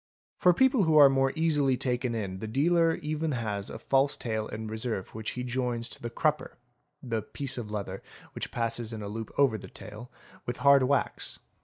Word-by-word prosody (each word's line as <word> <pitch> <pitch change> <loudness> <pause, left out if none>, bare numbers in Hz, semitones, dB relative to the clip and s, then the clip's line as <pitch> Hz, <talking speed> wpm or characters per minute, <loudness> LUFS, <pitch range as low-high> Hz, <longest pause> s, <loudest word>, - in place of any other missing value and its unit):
For 180 - +6
people 260 +1 +3
who 160 -1 +4
are 140 -2 +9
more 135 0 +2
easily 150 -5 +2
taken 125 -2 -1
in 95 -4 -4
the 110 - -5
dealer 165 +7 +3
even 155 0 -1
has 105 -5 -3
a - - -6
false 135 +1 +2
tail 110 -2 -2
in 110 +1 -6
reserve 110 -2 -3
which 110 0 -5
he 125 - -2
joins 125 -1 -2
to - - -7
the 120 - -4
crupper 115 - -1 0.5
(the 115 -3 -2
piece 140 +5 -3
of 115 -4 -5
leather 100 -2 -4 0.3
which - - -4
3 - - -24
_ - - -28
passes 115 -1 -2
in 110 -1 -5
a - - -5
loop 110 +1 -6
over 130 -6 +3
the - - -10
tail) 110 +4 -10 0.4
with 120 - -3
hard 140 -1 +6
wax. 140 +2 0
125 Hz, 205 wpm, -29 LUFS, 110-140 Hz, 0.5 s, are